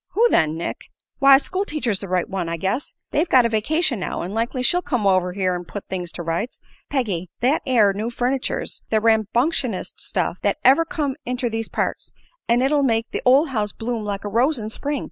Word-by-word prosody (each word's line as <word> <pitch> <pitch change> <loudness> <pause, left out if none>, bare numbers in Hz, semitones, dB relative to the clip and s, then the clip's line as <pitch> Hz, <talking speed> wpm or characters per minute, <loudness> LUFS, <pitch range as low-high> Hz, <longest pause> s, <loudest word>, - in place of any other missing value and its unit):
"Who 460 +4 +4
then, 155 0 +2
Nick?" 170 - -3 0.4
"Why, 275 -1 +8
school 370 +7 -2
teacher's 255 - -2
the 200 - -6
right 180 -1 0
one, 190 -4 -3
I 170 - -2
guess. 195 - -2 0.2
They've 320 +4 +1
got 255 -2 +6
a - - +2
vacation 245 - +1
now, 180 - -3
an' 180 +3 -5
likely 235 +3 -1
she'll 355 +7 +3
come 250 - -1
over 185 -2 +2
here 185 -1 0
an' 175 0 -4
put 200 +3 -8
things 180 -2 -3
to 175 - -5
rights. 170 +9 -3 0.3
Peggy, 200 - -1
that 265 +6 +2
air 220 -6 +4
new 215 +4 -3
furniture's 250 +2 -2
the 220 - +3
rambunctionest 225 - 0
stuff 180 -1 -2
thet 200 - +1
ever 275 +6 +5
come 290 -4 -2
inter 250 0 -2
these 225 0 -3
parts, - - -3 0.4
an' 240 +2 +3
it'll 285 +2 +3
make 230 -4 +1
the - - -3
ol' 265 +5 +6
house 210 -3 0
bloom 230 -1 -3
like 200 -1 -4
a - - -1
rose 250 +8 +2
in 215 -2 -4
Spring. 285 +5 -3
230 Hz, 210 wpm, -22 LUFS, 195-270 Hz, 0.4 s, Why